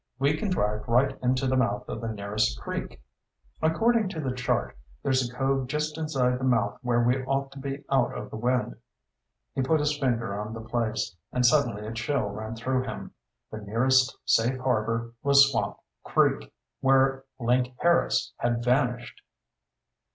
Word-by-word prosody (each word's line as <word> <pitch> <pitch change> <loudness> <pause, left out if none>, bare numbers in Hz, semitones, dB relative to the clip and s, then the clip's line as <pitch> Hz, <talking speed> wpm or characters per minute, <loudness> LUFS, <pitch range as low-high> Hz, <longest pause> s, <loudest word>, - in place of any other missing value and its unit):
We 140 +3 +2
can 200 +6 -2
drive 105 - -1
right 125 +4 +3
into 130 +2 +1
the 130 0 +1
mouth 115 -5 0
of 110 - -5
the 115 - -3
nearest 100 - -1
creek. - - -6 0.6
According 215 +6 +2
to 165 - -6
the 135 -4 -2
chart, 125 0 -1 0.3
there's 130 -2 +1
a - - -12
cove 135 0 0
just 150 +2 -2
inside 135 -6 0
the - - -6
mouth 120 -4 +1
where 120 -2 +1
we 125 +2 +2
ought 135 0 -1
to 135 - -10
be 140 +1 -5
out 135 -3 +1
of - - -7
the - - -6
wind." 125 - -1 0.8
He - - -1
put 155 +4 +2
his 150 0 +1
finger 120 -7 -1
on 110 +2 -6
the - - -6
place, 110 -3 -2 0.2
and 125 0 +1
suddenly 120 -7 +2
a 110 - -5
chill 130 +6 -1
ran 110 +2 -6
through 130 +3 0
him. - - -6 0.4
The 110 - -6
nearest 130 +5 +2
safe 120 +3 +2
harbor 115 -2 -1
was 140 0 +6
Swamp 120 - -1 0.3
Creek, - - +1 0.3
where 135 0 +3
Link 125 +1 +1
Harris 170 0 +2
had 120 0 0
vanished! 125 -1 0
125 Hz, 170 wpm, -27 LUFS, 115-135 Hz, 0.8 s, was